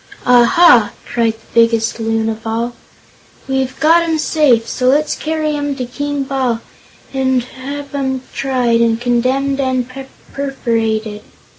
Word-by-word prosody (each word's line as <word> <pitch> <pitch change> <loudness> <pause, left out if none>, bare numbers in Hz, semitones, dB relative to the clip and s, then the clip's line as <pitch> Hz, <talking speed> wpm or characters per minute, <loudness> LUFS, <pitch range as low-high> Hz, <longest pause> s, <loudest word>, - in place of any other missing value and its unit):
"Aha!" 245 - +5
cried 230 -2 0
the 220 0 -22 0.2
biggest 230 0 +1
Loon 225 0 0
of 225 0 -4
all; 230 +2 -2 0.7
"we've 265 -1 -2
got 325 +2 +5
'em 330 -1 0
safe; 280 -7 +2
so 250 +1 -1
let's 290 +4 +2
carry 310 -1 -2
'em 290 -1 -2
to 255 -2 -4
King 285 +3 -3
Bal 265 -4 -1 0.5
and 260 -2 +1
have 280 +3 -8
'em 265 -2 -2
tried, 250 -4 +1
and 230 -1 +2
condemned 255 +3 0
and 260 -2 0 0.5
perforated!" 225 -6 -2
255 Hz, 135 wpm, -16 LUFS, 230-280 Hz, 0.7 s, Aha